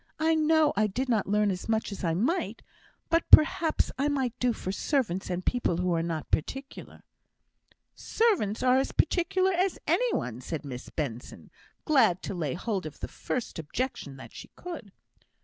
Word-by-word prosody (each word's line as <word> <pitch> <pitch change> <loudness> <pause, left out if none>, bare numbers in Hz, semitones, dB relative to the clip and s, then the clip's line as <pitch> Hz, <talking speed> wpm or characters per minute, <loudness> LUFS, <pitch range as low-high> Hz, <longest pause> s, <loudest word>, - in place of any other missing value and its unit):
I 320 +1 +2
know 315 -1 +3
I 215 +1 +3
did 250 +6 -3
not 220 -5 +1
learn 210 0 +2
as 185 +3 -6
much 220 -1 0
as 200 - -7
I 165 -2 +1
might, 260 - -1 0.5
but 330 0 +2
perhaps 315 +1 +5
I 280 - +2
might 265 -5 0
do 250 -1 +2
for 190 -4 -4
servants, 205 - -1
and 180 0 -3
people 245 -9 0
who 180 0 0
are 165 - +1
not 165 -2 -4
particular." 270 - -4 0.9
"Servants 380 - 0
are 255 0 +5
as 270 - -1
particular 370 +2 +2
as 365 +1 +1
any - - +2
one," 125 - -3
said 150 +3 -5
Miss 130 -2 -7
Benson, 125 -6 -6 0.3
glad 265 - +3
to - - -4
lay 160 -6 -2
hold 190 -2 -3
of 155 - -11
the - - -4
first 245 -8 -4
objection 155 - -4
that - - -12
she - - -10
could. 325 - -8
220 Hz, 175 wpm, -28 LUFS, -, 0.9 s, perhaps